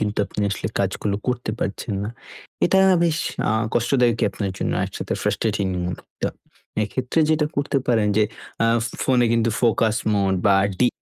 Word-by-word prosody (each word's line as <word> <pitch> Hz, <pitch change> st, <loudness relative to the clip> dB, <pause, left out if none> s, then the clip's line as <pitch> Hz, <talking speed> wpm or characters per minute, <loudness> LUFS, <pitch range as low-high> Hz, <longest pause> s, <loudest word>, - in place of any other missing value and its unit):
কিন্তু 105 Hz, 0 st, -1 dB
আপনি 105 Hz, -, -5 dB
আসলে 95 Hz, -, -2 dB
কাজগুলো 100 Hz, -1 st, -1 dB
করতে 125 Hz, -3 st, -1 dB
পারছেন 100 Hz, 0 st, -3 dB
না। 105 Hz, -, -3 dB, 0.6 s
এটা 190 Hz, -, +4 dB, 0.3 s
বেশ 160 Hz, -2 st, +1 dB, 0.3 s
আ -, -, +2 dB, 0.2 s
কষ্টদায়কই 120 Hz, -2 st, +2 dB
আপনার 100 Hz, -1 st, -3 dB
জন্য -, -, -1 dB
একসাথে -, -, -4 dB
ফ্রাস্ট্রেটিং। 100 Hz, -, 0 dB, 0.6 s
তো -, -, +2 dB, 0.6 s
এক্ষেত্রে 125 Hz, +8 st, -1 dB
যেটা 155 Hz, -1 st, +2 dB
করতে 145 Hz, 0 st, +1 dB
পারেন 110 Hz, -3 st, +3 dB
যে, 110 Hz, -, +5 dB, 0.4 s
আ -, -, +4 dB, 0.4 s
ফোনে 125 Hz, -2 st, +3 dB
কিন্তু 115 Hz, 0 st, +2 dB
ফোকাস 115 Hz, -2 st, +2 dB, 0.2 s
মোড 100 Hz, -2 st, +2 dB
বা 100 Hz, -1 st, +5 dB, 0.2 s
ডি 125 Hz, -, +5 dB
115 Hz, 150 wpm, -22 LUFS, 105-125 Hz, 0.6 s, যে